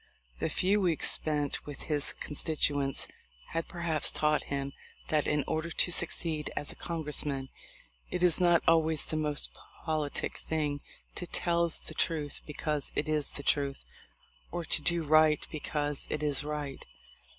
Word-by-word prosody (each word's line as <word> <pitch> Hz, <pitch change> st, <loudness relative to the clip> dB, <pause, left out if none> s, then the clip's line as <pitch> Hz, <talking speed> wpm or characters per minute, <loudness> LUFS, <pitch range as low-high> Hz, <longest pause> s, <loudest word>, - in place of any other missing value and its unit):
The -, -, 0 dB
few 200 Hz, +3 st, +2 dB
weeks 170 Hz, -4 st, +3 dB
spent 150 Hz, -2 st, 0 dB
with 145 Hz, -2 st, -7 dB
his 150 Hz, -2 st, +3 dB
constituents 145 Hz, -2 st, 0 dB, 0.4 s
had 165 Hz, 0 st, -2 dB
perhaps 170 Hz, -4 st, +1 dB
taught 150 Hz, 0 st, +1 dB
him 140 Hz, 0 st, -3 dB, 0.4 s
that 155 Hz, -1 st, +2 dB
in 150 Hz, -1 st, +2 dB
order 160 Hz, +1 st, -2 dB
to 175 Hz, -, +2 dB
succeed 165 Hz, -2 st, -1 dB
as 145 Hz, -, 0 dB
a -, -, -10 dB
Congress 160 Hz, -3 st, -3 dB
man 135 Hz, -2 st, -3 dB, 0.6 s
it 180 Hz, -, -2 dB
is 180 Hz, 0 st, +7 dB
not 175 Hz, -1 st, +5 dB
always 160 Hz, -2 st, +4 dB
the -, -, -3 dB
most 150 Hz, -1 st, +1 dB, 0.3 s
politic 155 Hz, -3 st, -2 dB
thing 150 Hz, -3 st, -2 dB, 0.3 s
to 175 Hz, -, -6 dB
tell 170 Hz, 0 st, +1 dB, 0.2 s
the -, -, -6 dB
truth 150 Hz, -4 st, -1 dB
because 150 Hz, -1 st, -1 dB
it 150 Hz, -, 0 dB
is 155 Hz, -2 st, +2 dB
the 140 Hz, -, -7 dB
truth, 140 Hz, -1 st, 0 dB, 0.7 s
or 175 Hz, -1 st, -3 dB
to 155 Hz, -, +2 dB
do 170 Hz, +2 st, +1 dB
right 155 Hz, 0 st, +4 dB
because 150 Hz, -2 st, -1 dB
it 150 Hz, -, -2 dB
is 145 Hz, -1 st, +2 dB
right. 145 Hz, -2 st, -4 dB
155 Hz, 155 wpm, -31 LUFS, 145-165 Hz, 0.7 s, is